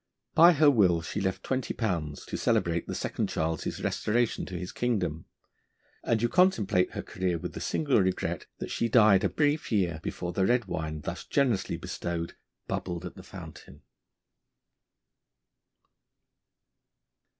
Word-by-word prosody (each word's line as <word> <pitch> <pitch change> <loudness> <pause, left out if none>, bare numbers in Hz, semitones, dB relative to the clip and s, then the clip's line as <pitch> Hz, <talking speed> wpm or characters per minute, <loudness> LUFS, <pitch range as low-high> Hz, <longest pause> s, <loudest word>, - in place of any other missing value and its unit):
By 170 +2 +8
her 150 -1 +6
will 90 -9 +3
she 100 - -3
left 95 -1 -2
twenty 130 -1 -2
pounds 85 -10 -2
to - - -5
celebrate 85 0 +1
the - - -4
Second - - -2
Charles's 80 -1 -2
restoration 120 +2 0
to 90 - -5
his 90 +1 -5
kingdom; 90 -10 -1 0.8
and 115 -1 +1
you - - +4
contemplate 115 - +3
her - - -4
career 90 -2 -2
with 90 +2 -6
the - - -6
single 145 -8 +2
regret 95 -1 -1
that - - -6
she 115 - 0
died 105 -4 +6
a 100 - +2
brief 150 -1 0
year 90 -7 +1
before 85 +1 -4
the 95 - +1
red 120 -1 +2
wine, 80 -4 -4
thus - - -5
generously 125 -8 0
bestowed, 85 -1 -4 0.3
bubbled 85 -1 -3
at 90 - -6
the - - -11
fountain. 70 - -11
95 Hz, 145 wpm, -28 LUFS, 85-120 Hz, 0.8 s, By